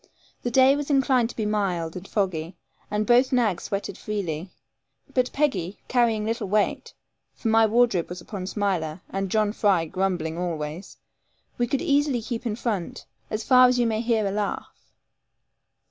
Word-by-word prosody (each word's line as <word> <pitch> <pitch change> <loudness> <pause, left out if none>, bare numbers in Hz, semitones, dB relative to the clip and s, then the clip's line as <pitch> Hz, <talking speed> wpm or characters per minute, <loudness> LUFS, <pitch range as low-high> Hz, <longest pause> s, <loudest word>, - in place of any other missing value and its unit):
The 245 - -2
day 265 +3 +5
was 290 0 -4
inclined 265 -4 +3
to - - -9
be 220 - -2
mild 185 -6 -1
and 185 +2 -7
foggy, 180 -4 -2 0.3
and 210 +1 0
both 245 +2 +4
nags 225 -9 +1
sweated 200 0 -4
freely; 185 -5 -4 0.6
but 250 -1 +1
Peggy 205 - -1
carrying 230 -4 +2
little 225 -1 -2
weight 210 +2 0 0.4
(for 225 - -2
my 225 0 +5
wardrobe 225 -6 +2
was 180 +1 -6
upon 185 +1 -6
Smiler, 185 -6 -2
and 195 0 -2
John 215 0 +1
Fry 195 -7 +2
grumbling 175 -2 -2
always), 165 0 -4 0.6
we 240 - +2
could 265 +2 -1
easily 285 -3 +2
keep 235 +1 -4
in 210 - -2
front, 215 -6 -3 0.2
as 215 0 -3
far 255 +1 +7
as 250 0 +2
you 240 - +2
may 220 -1 0
hear 225 -3 +1
a 195 - 0
laugh. 205 0 -3
210 Hz, 165 wpm, -25 LUFS, 185-240 Hz, 0.6 s, far